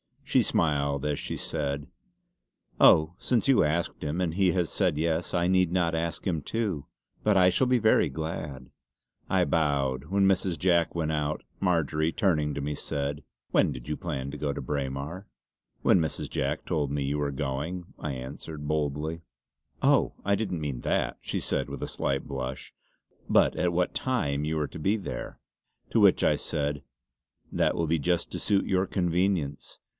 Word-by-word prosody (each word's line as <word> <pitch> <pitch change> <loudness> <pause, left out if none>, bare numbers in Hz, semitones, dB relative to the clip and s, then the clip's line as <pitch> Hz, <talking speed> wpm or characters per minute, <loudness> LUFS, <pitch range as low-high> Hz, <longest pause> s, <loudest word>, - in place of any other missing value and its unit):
She - - +3
smiled 70 -3 +1
as 75 -1 0
she - - -4
said: 70 -1 -3 0.9
"Oh 80 +2 +6
since 125 +1 +1
you 135 - +6
asked 80 +3 -1
him 75 +4 -2
and 85 -3 0
he 95 -1 +3
had 90 -2 0
said 90 -7 +1
yes 80 +2 0
I 85 -1 +2
need 90 -2 +3
not 85 -3 +2
ask 80 +1 -2
him 85 -6 0
too; 100 -5 -2 0.4
but 105 -1 +3
I 90 -1 +6
shall 125 +8 +2
be 125 -1 +3
very 110 -6 +4
glad!" 75 -2 -5 0.6
I - - +3
bowed. 70 -3 +1
When 100 +4 +2
Mrs. 95 -2 +2
Jack 85 +1 +2
went 80 -2 0
out, 75 0 -1 0.2
Marjory 80 -3 +1
turning 75 -7 +1
to 70 - -3
me 75 +1 -2
said: 70 +1 -3 0.3
"When - - +3
did 65 +3 -9
you 75 - -1
plan 70 -6 -4
to - - -6
go 70 -2 -1
to - - -5
Braemar?" 70 +6 -4 0.5
"When 95 - +5
Mrs. 80 -1 -2
Jack - - -2
told 75 -4 -1
me 70 -1 -1
you 70 +2 -1
were 75 -1 0
going" 75 +6 -3 0.2
I 75 - -3
answered 75 +3 -7
boldly. 75 +2 -1 0.6
"Oh! - - +4
I 100 +1 +2
didn't 95 -6 -2
mean 70 -5 -3
that," - - 0
she - - -3
said - - -1
with - - -5
a - - -2
slight 70 0 -1
blush 65 -1 -5 0.6
"but - - +5
at 90 -1 +1
what 90 +1 +1
time 75 - 0
you 80 +1 -1
were 75 -2 0
to - - -8
be 95 +7 +2
there." 105 - -6 0.5
To - - +2
which - - +5
I - - +4
said: 75 -1 -2 0.7
"That - - +1
will 85 - 0
be 80 +1 +1
just 85 +3 0
to - - -4
suit 100 -2 +1
your 95 0 +1
convenience. 90 -5 -1
80 Hz, 180 wpm, -28 LUFS, 70-90 Hz, 0.9 s, Oh